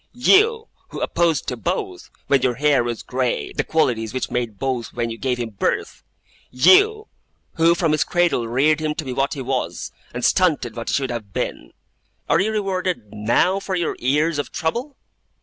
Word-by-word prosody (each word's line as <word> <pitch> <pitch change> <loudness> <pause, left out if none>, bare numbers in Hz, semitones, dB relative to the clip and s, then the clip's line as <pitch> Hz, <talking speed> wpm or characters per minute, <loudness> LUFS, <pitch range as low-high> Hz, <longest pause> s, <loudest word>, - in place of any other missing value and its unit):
You, 430 - +4 0.2
who - - -7
opposed 165 -4 +1
to 125 - -3
both, 115 - -4 0.2
when 140 -2 +3
your 125 -1 +1
hair 140 -1 +3
was 120 -1 -4
grey, 125 -1 -2
the - - -1
qualities 120 -8 0
which 130 - -3
made 120 -4 -2
both 125 0 -3
when 120 -1 -2
you 115 - -6
gave 130 -2 -1
him 120 -2 -4
birth! 100 - -2 0.5
YOU, 405 - +5 0.5
who 165 +1 +4
from 165 -2 +1
his 155 - +2
cradle 175 -9 +1
reared 145 +7 +2
him 155 -1 -2
to 155 - -5
be 130 - -4
what 135 +4 0
he 135 - -5
was, 130 0 -3 0.2
and 120 +1 -3
stunted 155 - +2
what 115 -1 -5
he - - -1
should 135 -2 0
have 110 -5 -6
been! - - -4 0.5
Are 165 - +3
you 215 +3 0
rewarded, 185 - -2
now, 115 - +2
for 195 -1 -3
your 170 -3 -1
years 150 +5 +1
of 145 - -4
trouble? 240 - -3
140 Hz, 185 wpm, -21 LUFS, 120-175 Hz, 0.5 s, YOU